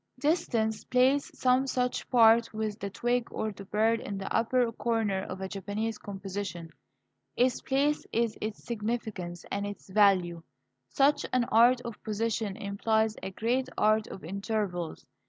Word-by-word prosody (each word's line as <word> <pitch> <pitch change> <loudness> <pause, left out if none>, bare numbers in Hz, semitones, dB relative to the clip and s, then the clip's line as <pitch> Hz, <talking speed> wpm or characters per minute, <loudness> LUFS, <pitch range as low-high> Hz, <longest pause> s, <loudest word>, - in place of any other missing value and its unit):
Distance 245 -7 0
plays 260 +3 +3
some 255 +1 +3
such 250 -1 -1
part 230 -1 +5
with 215 -1 -3
the 200 - -4
twig 240 +4 0
or 220 - -3
the 200 0 -10
bird 220 +3 +2
in 200 - -5
the 195 - -4
upper 235 +1 +2
corner 225 -4 0
of 190 0 -7
a 190 - -2
Japanese 205 +3 -3
composition. 195 -4 -6 0.6
Its 250 0 +2
place 285 +3 +1
is 230 -1 0
its 215 0 -4
significance 210 -6 -4
and 200 0 -1
its 205 -1 -9
value. 185 -4 +3 0.5
Such 285 +2 +3
an 255 -1 +3
art 240 +3 +6
of 235 -3 -8
position 215 -2 -2
implies 220 +2 0
a - - -4
great 245 +6 -1
art 215 0 +3
of 190 - -9
intervals. 195 -3 -3
220 Hz, 150 wpm, -29 LUFS, 200-240 Hz, 0.6 s, art